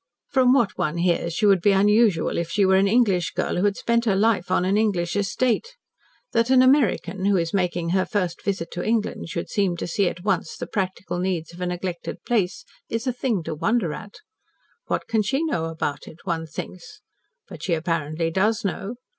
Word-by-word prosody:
"From 260 -2 +4
what 240 -6 +2
one 155 +2 -1
hears, 170 -1 +1
she 215 - +1
would 195 -3 +5
be 200 +3 +4
unusual 205 -3 +3
if 170 -1 -3
she 200 +3 +2
were 190 0 +4
an 195 +1 +3
English 200 -6 +2
girl - - -1
who 180 - +1
had 205 0 +1
spent 235 0 +1
her 205 -4 +2
life 205 -2 +2
on 180 - +2
an 190 +2 +2
English 195 -6 +1
estate. 240 - 0 0.6
That 230 +1 +2
an 260 -1 +6
American 205 - +2
who 200 -1 +3
is 165 -1 -1
making 175 -3 0
her 185 +2 +2
first 180 -5 -2
visit 185 -4 -2
to 175 - -4
England 220 -6 -1
should 170 - -4
seem 195 -4 0
to - - -3
see 180 +2 +1
at 175 - -9
once 195 -2 -1
the - - -4
practical 185 -3 -3
needs 175 -3 -2
of 175 - -11
a 180 - -1
neglected 180 -1 -5
place 205 -7 0 0.2
is 230 +2 -2
a 255 - 0
thing 235 -7 -1
to 160 - -4
wonder 180 +1 0
at. 205 - -9 0.7
What - - -1
can 220 -1 +2
she 270 +9 0
know 285 - -1
about 160 -3 -4
it, 160 - -11
one 165 -2 -2
thinks. 430 - -9 0.5
But - - -10
she 175 - 0
apparently 165 0 -1
does 210 +5 +1
know. 200 +4 -3
195 Hz, 205 wpm, -24 LUFS, 175-225 Hz, 0.7 s, an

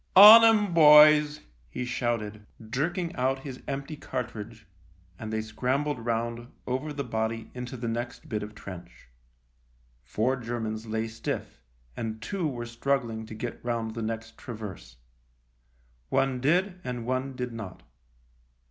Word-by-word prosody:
" - - -39
On 215 +4 +12
'em, 215 -4 +4
boys! 150 -1 +7
" - - -34
he 125 - -4
shouted, 110 -4 -3 0.2
jerking 170 +6 -1
out 135 +1 0
his 130 -3 -8
empty 140 +2 -4
cartridge, 115 -5 -6 0.5
and 110 0 -6
they 110 0 -1
scrambled 130 +5 -1
round, 115 0 -2 0.2
over 130 +4 -2
the 140 -1 -3
body, 110 -1 -3
into 125 +1 -6
the 120 0 -4
next 120 +6 -4
bit 110 -7 -2
of 105 +1 -8
trench. 85 - -11 0.9
Four 115 - 0
Germans 115 -2 -4
lay 110 +1 -2
stiff, 115 0 -5 0.3
and 110 -1 -4
two 185 - -2
were 120 -4 -4
struggling 115 -2 -2
to 110 - -8
get 120 +2 -6
round 115 -2 -2
the 115 - -5
next 115 0 -5
traverse. 100 - -8 1.1
One 135 -1 +1
did 180 +6 +1
and 125 -2 -4
one 130 +2 -2
did 125 -2 -4
not. 110 -5 -8
120 Hz, 145 wpm, -27 LUFS, 110-140 Hz, 1.1 s, On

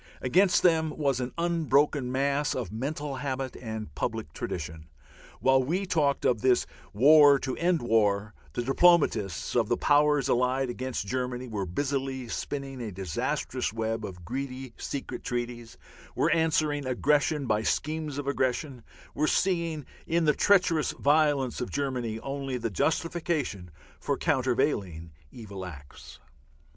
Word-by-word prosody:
Against 180 +9 +3
them 160 -3 +4
was 140 -4 +1
an 125 0 -3
unbroken 150 -5 +1
mass 140 +2 0
of 125 -5 -4
mental 140 +4 -4
habit 135 -1 -3
and 110 - -6
public - - -4
tradition. 80 -1 -5 0.5
While 130 0 +4
we 180 +9 -1
talked 150 -6 +1
of 120 -4 +2
this 130 -1 +3 0.3
"war 145 +4 +7
to 130 -1 -3
end 170 -4 +1
war," 105 -2 +2 0.2
the 120 - -2
diplomatists 135 - +2
of 115 -3 +2
the 120 - +2
Powers 145 -1 +3
allied 125 +1 +1
against 130 -3 -4
Germany 125 +2 -3
were 100 -5 -3
busily 135 +4 -2
spinning 135 -1 -4
a 110 -3 -4
disastrous 95 -1 -2
web 115 0 -2
of 90 -4 -8
greedy 130 +1 -5
secret 140 - -5
treaties, 120 -1 -4 0.4
were - - +2
answering 155 -3 +1
aggression 145 +3 +1
by 110 -2 +1
schemes 155 +4 -2
of 145 - -3
aggression, 130 -2 -1 0.3
were 155 +2 0
seeing 170 -6 0 0.2
in 170 0 +1
the 150 - +4
treacherous 180 -4 +3
violence 145 -4 +2
of 125 - -3
Germany 125 -6 -2
only 135 -1 -3
the 115 -2 -3
justification 155 - -1 0.3
for - - -1
countervailing 120 - 0 0.2
evil 100 -5 -8
acts. 70 -6 -11
130 Hz, 135 wpm, -28 LUFS, 115-150 Hz, 0.5 s, war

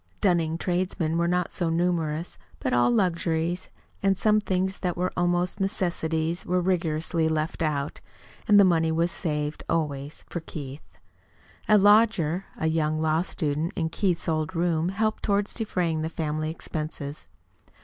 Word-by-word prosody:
Dunning 165 -4 +2
tradesmen 175 -2 -1
were 170 0 +2
not 180 0 0
so 170 -2 -1
numerous. 165 -1 -1 0.2
But 130 - -1
all 120 0 +4
luxuries, 170 +4 0 0.3
and 195 -1 +2
some 215 +1 +3
things 190 -1 -1
that 180 -3 -2
were 180 +1 -1
almost 175 +2 0
necessities, 170 -3 -1
were 180 +1 +1
rigorously 165 -2 0
left 155 +1 -2
out. 145 -3 -1 0.5
And 205 -1 +7
the - - +8
money 165 -3 +3
was 165 +2 +1
saved 150 -4 -2
always 150 -3 -2
for 175 - -4
Keith. 145 -3 -9 0.7
A 215 - +7
lodger, 205 -4 +4
a - - -2
young 155 -1 +1
law 160 +1 +2
student, 155 -2 -2
in 160 -2 -1
Keith's 180 0 0
old 160 +2 -1
room 170 0 +1
helped 215 +3 -1
toward 200 0 +1
defraying 180 -8 -1
the 160 - -2
family 155 -1 -2
expenses. 155 - -5
165 Hz, 150 wpm, -26 LUFS, 155-180 Hz, 0.7 s, the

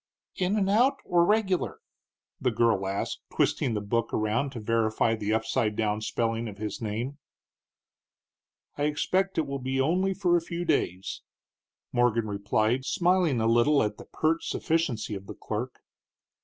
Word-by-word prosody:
"In 190 +3 0
and 195 -2 +2
out, 245 +8 +4
or 175 -1 +3
regular?" 195 -2 +1 0.6
the 130 - +1
girl 110 -4 +2
asked, 100 +1 -2
twisting 115 - +1
the 105 - -1
book 115 +3 -1
around 110 +6 0
to 120 - -5
verify 115 0 +1
the 105 -1 -2
upside 110 -1 0
down 105 -1 0
spelling 115 +1 -1
of 100 -2 -8
his 105 +2 -5
name. 115 +6 -3 1.6
"I 145 - +2
expect 185 +6 0
it 160 - +2
will 140 0 -4
be 130 +1 -2
only 185 +7 +2
for 180 -2 +2
a 170 - +3
few 170 +1 -4
days," 95 - -1 0.7
Morgan 120 -2 +2
replied, 110 +4 0
smiling 175 -4 +2
a 110 - +1
little 120 +6 +4
at 105 0 -2
the - - -11
pert 160 +1 0
sufficiency 155 -11 -1
of 100 -1 -7
the - - -7
clerk. 120 +4 -5
120 Hz, 155 wpm, -27 LUFS, 110-165 Hz, 1.6 s, out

